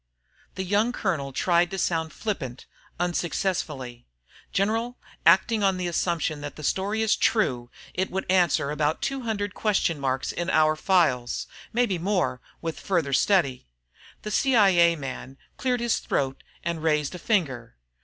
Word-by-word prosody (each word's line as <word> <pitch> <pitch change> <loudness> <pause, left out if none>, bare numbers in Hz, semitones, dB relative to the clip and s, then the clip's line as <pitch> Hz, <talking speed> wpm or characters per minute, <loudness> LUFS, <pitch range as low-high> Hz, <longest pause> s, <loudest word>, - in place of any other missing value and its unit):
The 190 - -3
young 205 +5 +2
colonel 165 - -2
tried 175 +5 +2
to 195 - -5
sound 165 -3 0
flippant, 135 - -4 0.3
unsuccessfully. 160 -7 -2 0.4
"General, 225 +5 0 0.3
acting 205 +6 +5
on 195 -2 +2
the 180 - -2
assumption 165 -3 -1
the 145 +1 -7
story 200 +8 0
is 220 - +3
true, 125 - +1 0.2
it 190 +1 -1
would 190 +1 -3
answer 175 -6 +2
about 150 +1 0
two 275 -1 -1
hundred 205 -4 -2
question 195 -7 0
marks 130 -1 -1
in 175 +1 -3
our 155 -2 +4
files. 155 -9 +1 0.3
Maybe 225 -7 +1
more, 180 -8 0 0.2
with 165 -1 -3
further 170 -8 0
study." 135 - +2 0.6
The 210 - -4
C.I.A. 195 -9 +4
man 135 -2 -7 0.2
cleared 250 -2 0
his 235 -1 +1
throat 135 -1 -2 0.2
and 170 -2 -2
raised 150 -1 +1
a 180 - -7
finger. 140 - -1
175 Hz, 145 wpm, -26 LUFS, 150-200 Hz, 0.6 s, acting